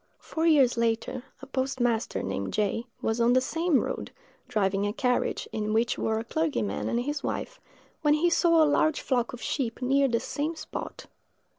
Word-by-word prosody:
Four 325 +1 -2
years 275 -7 +5
later, 230 +2 -1 0.2
a - - -5
postmaster, 260 -4 -1
named 95 0 -3
J——, 215 +3 0 0.2
was 225 +1 0
on 235 +1 +4
the 255 - +5
same 325 +3 +1
road, - - -4 0.4
driving 200 -4 +1
a 205 - -2
carriage, 250 0 0
in 215 0 -2
which 230 +2 +2
were 220 0 0
a 225 - -2
clergyman 300 -4 -1
and 235 - +1
his 290 +3 -3
wife, - - -4 0.4
when 295 -1 +4
he 340 +3 +2
saw 335 -1 +5
a - - +5
large 305 +1 +2
flock 245 -3 0
of 245 -2 -9
sheep 240 -6 -2
near 275 +2 +3
the 235 -2 +1
same 300 +6 -3
spot. 310 - -7
255 Hz, 180 wpm, -27 LUFS, 225-300 Hz, 0.4 s, years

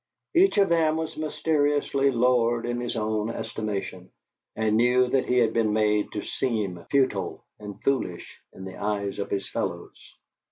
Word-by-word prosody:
Each 370 - +4
of 200 -1 +4
them 160 -2 +2
was 160 -1 -4
mysteriously 145 -2 +1
lowered 120 -2 +2
in 120 0 -2
his 120 - -3
own 110 0 -1
estimation, 105 -5 -5 0.5
and 110 -1 +1
knew 125 +2 +4
that 130 0 +1
he 125 - +2
had 120 -2 +3
been 110 -2 +1
made 105 -1 +1
to 105 - -3
seem 105 -9 -2
futile 130 -9 0
and 105 -2 -9
foolish 125 -11 -2
in 95 - -10
the 95 -1 -8
eyes 100 -1 -2
of 100 - -3
his 100 -1 -2
fellows. 85 -2 -6
115 Hz, 160 wpm, -26 LUFS, 105-135 Hz, 0.5 s, Each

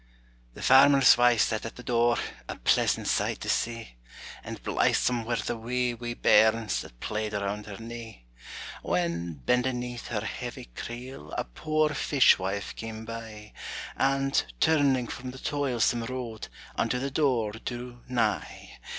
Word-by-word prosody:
The - - -8
farmer's 135 0 +7
wife 120 -2 +4
sat 110 - +1
at 115 - -6
the 125 - -10
door, 120 -1 +2 0.3
A - - -3
pleasant - - +2
sight - - 0
to - - -4
see; 115 - -2 0.5
And - - -7
blithesome 120 -2 +1
were 120 +1 0
the 115 +2 -2
wee, 125 +2 -1
wee 120 0 -5
bairns 110 0 +4
That - - -13
played 105 - -3
around 100 +1 -3
her 100 -2 -7
knee. 115 - -9 0.6
When, 85 -1 -1
bending 125 - +1
'neath 125 -1 -6
her - - -2
heavy - - -5
creel, 120 - -7
A - - 0
poor 155 - 0
fish 145 -5 +4
wife 95 +1 -3
came 110 0 -7
by, 110 -2 -8 0.4
And, 135 0 +2 0.2
turning 140 -5 +3
from 125 +2 -6
the 130 - -8
toilsome 125 -5 0
road, 120 -3 -5 0.3
Unto 125 - 0
the 135 +2 -3
door 130 -7 +1
drew 120 +2 -7
nigh. 125 -2 -2
120 Hz, 150 wpm, -28 LUFS, 110-125 Hz, 0.6 s, farmer's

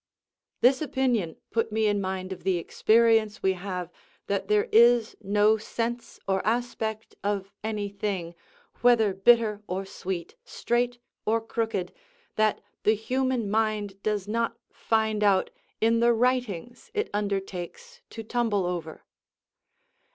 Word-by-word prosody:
This 260 +3 +5
opinion 250 - 0 0.2
put 225 -1 0
me 220 0 +1
in 205 -1 +2
mind 190 0 -3
of 185 - -12
the 190 -1 +2
experience 220 +3 +3
we 190 - +3
have 180 -2 -5 0.3
that 200 -1 -2
there 210 0 +2
is 235 0 +5
no 210 +2 +3
sense 235 +2 -4
or 190 -1 +1
aspect 220 -1 -2
of 200 -1 -2
any 215 -2 -2
thing, 195 -4 -3 0.5
whether 230 -4 +4
bitter 215 +1 +4
or 190 +2 -3
sweet, 185 -2 -5
straight 240 0 -1 0.3
or 225 +1 +2
crooked, 225 -4 -3 0.4
that 215 -1 +2 0.2
the 215 - +3
human 255 +1 -1
mind 210 -2 -1
does 210 -2 -1
not 230 +2 -1
find 220 -1 0
out 195 -2 +3 0.3
in 230 +1 +3
the 235 0 +4
writings 245 -3 -1
it 425 - -1
undertakes 200 - -4
to 225 - -7
tumble 220 -4 0
over. 170 -3 -4
215 Hz, 130 wpm, -27 LUFS, 195-230 Hz, 0.5 s, This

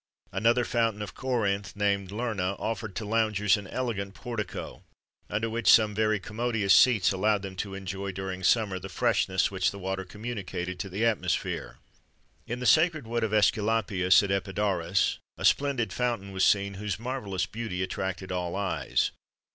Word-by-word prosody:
Another 115 +5 +2
fountain 115 -3 0
of 100 - -7
Corinth, 100 -7 -1
named 100 -2 0
Lerna, 105 -4 -2
offered 110 -3 -4
to 110 - -3
loungers 105 -1 +2
an 105 -3 -6
elegant 100 -5 -3
portico, 115 -6 -5 0.5
under 110 +2 -1
which 115 -2 +3
some 110 -1 +6
very 110 0 +1
commodious 110 -1 +1
seats 115 -5 +5
allowed 100 +1 +1
them 95 -1 -6
to 95 0 -4
enjoy, 95 0 -4
during 95 0 -5
summer, 100 -1 +2
the 95 - -8
freshness - - +1
which - - +1
the 100 - -8
water 95 0 -3
communicated 95 -4 -5
to 100 - -4
the 100 +5 -1
atmosphere. 90 - -1 0.7
In 120 +1 -3
the 125 - -4
sacred 155 +2 +4
wood 115 +1 -1
of 110 - +1
Æsculapius, 105 -3 +3
at 100 - -2
Epidaurus, 95 -2 0 0.2
a - - -3
splendid 130 -8 +2
fountain 115 -5 -1
was 95 -1 0
seen 100 -1 +3
whose 105 -3 -2
marvellous 110 -6 -3
beauty 110 -5 -4
attracted 95 0 -4
all 90 -1 -2
eyes. 100 -1 0
105 Hz, 160 wpm, -28 LUFS, 95-115 Hz, 0.7 s, some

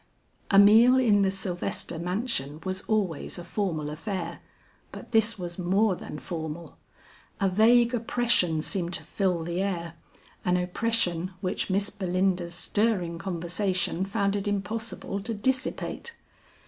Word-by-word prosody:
A 195 - +4
meal 225 +6 +8
in 220 -6 +4
the 195 - +3
Sylvester 185 -3 -3
mansion 175 - -2
was 190 0 -1
always 195 -9 -1
a 175 - -6
formal 170 -5 -2
affair, 170 +1 -4 0.5
but - - -10
this 225 -1 +3
was 175 -1 -6
more 190 +3 +2
than 150 - -8
formal. 160 0 -6 0.6
A 195 - +2
vague 235 +5 +4
oppression 225 -9 +1
seemed 175 -1 -2
to - - +3
fill 180 -4 -1
the 170 +2 -2
air; 170 -4 -2 0.5
an 180 0 +2
oppression 180 -1 -1
which 185 +2 -2
Miss 200 +2 +1
Belinda's 185 -3 0
stirring 185 -4 +1
conversation 180 0 -1
found 200 0 0
it 200 0 -2
impossible 205 0 -2
to 225 +3 -4
dissipate. 260 - -2
190 Hz, 135 wpm, -27 LUFS, 175-210 Hz, 0.6 s, meal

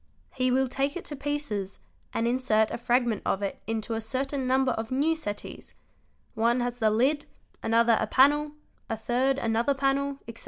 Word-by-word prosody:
He 255 0 +1
will 260 +1 +2
take 275 +4 -1
it 360 - -8
to 295 - -5
pieces 270 -9 -3 0.3
and 230 - 0
insert 235 -3 +2
a - - -3
fragment 240 -2 +1
of 195 - -1
it 195 - -4
into 225 0 -2
a 225 - -2
certain 265 +4 -2
number 260 0 +3
of 225 -1 -3
new 290 +5 +1
settees: 205 -10 -7 0.6
one 235 +2 +2
has 245 0 -2
the 220 -2 +3
lid, 265 +7 +1 0.3
another 230 0 +3
a 220 - 0
panel, 295 +5 +4 0.4
a 225 - -2
third 250 +4 +1
another 235 +3 +1
panel, 275 0 0
etc. 230 0 -7
250 Hz, 180 wpm, -27 LUFS, 225-275 Hz, 0.6 s, panel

